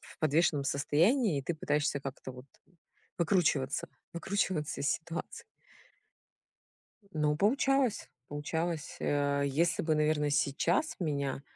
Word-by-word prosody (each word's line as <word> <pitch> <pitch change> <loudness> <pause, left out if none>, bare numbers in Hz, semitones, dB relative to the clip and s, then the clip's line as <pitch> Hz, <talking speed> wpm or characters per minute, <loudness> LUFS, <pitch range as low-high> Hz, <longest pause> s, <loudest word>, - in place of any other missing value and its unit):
в - - -16
подвешенном 155 -1 +2
состоянии 160 - +2
и - - -4
ты 170 - -2
пытаешься 150 -2 0
как-то 135 -1 -7
вот 125 +1 -12 0.7
выкручиваться, 160 -7 +1 0.3
выкручиваться 170 -4 -1
из 140 - +1
ситуации. 165 0 -4 1.7
Ну, 150 -1 +1
получалось, 260 - +2 0.2
получалось. 160 +2 -3
Э, 145 0 +1
если 165 +5 +1
бы, 155 -1 +2
наверно, 150 -1 +2
сейчас 170 - +1
меня 140 -5 -2
155 Hz, 110 wpm, -31 LUFS, 140-170 Hz, 1.7 s, подвешенном